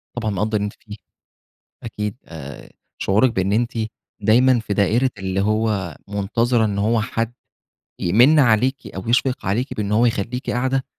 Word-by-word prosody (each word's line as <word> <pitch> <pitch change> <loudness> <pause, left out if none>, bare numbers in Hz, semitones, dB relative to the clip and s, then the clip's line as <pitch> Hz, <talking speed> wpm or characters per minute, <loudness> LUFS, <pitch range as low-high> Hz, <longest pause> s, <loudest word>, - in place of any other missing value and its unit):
طبعًا 110 -3 -2
مقدّر 105 +2 0
اللي 105 - -1
أنتِ 105 - -5
فيه، 105 -1 -10 0.9
أكيد 105 -2 -4
آآ، 70 -4 -10 0.3
شعورِك 110 +6 +2
بإن 95 -2 0
أنتِ 120 +2 +1 0.5
دايمًا 120 +4 +4
في 105 -2 -3
دائرة 110 +6 +2
اللي 95 0 -2
هو 105 -5 0
منتظرة 110 +4 +1
إن 100 -2 -2
هو 110 +3 +1
حد 115 +1 -2 0.7
يمنّ 120 - +5
عليكِ 130 0 +2
أو 95 +3 -6
يشفق 125 0 +1
عليكِ 115 +8 -1
بإن 105 -1 -2
هو 115 +3 +4
يخلّيكِ 120 +3 -2
قاعدة، 130 +2 0
110 Hz, 155 wpm, -21 LUFS, 100-120 Hz, 0.9 s, يمنّ